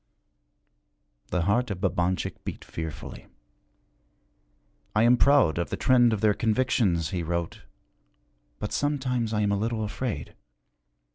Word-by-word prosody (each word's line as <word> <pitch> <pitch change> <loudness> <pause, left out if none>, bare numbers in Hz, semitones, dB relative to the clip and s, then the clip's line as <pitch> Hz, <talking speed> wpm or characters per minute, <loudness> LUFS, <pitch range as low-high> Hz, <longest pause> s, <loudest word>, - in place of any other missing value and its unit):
The 90 - -1
heart 115 +7 +1
of 100 -4 -4
Babanchik 90 -1 -1
beat - - -7
fearfully. 80 -3 -7 1.7
'I 110 - +4
am 120 +1 +6
proud 135 - +4
of 85 - -2
the - - -3
trend 120 -2 +4
of 110 -3 -1
their 105 -1 +4
convictions,' 110 -8 +1
he 90 -3 -2
wrote, 85 0 -3 1.0
'but 105 - -5
sometimes 130 -6 -1
I 105 -1 0
am 100 -1 +1
a 100 - +1
little 110 0 -1
afraid. 105 - -4
105 Hz, 130 wpm, -26 LUFS, 90-120 Hz, 1.7 s, am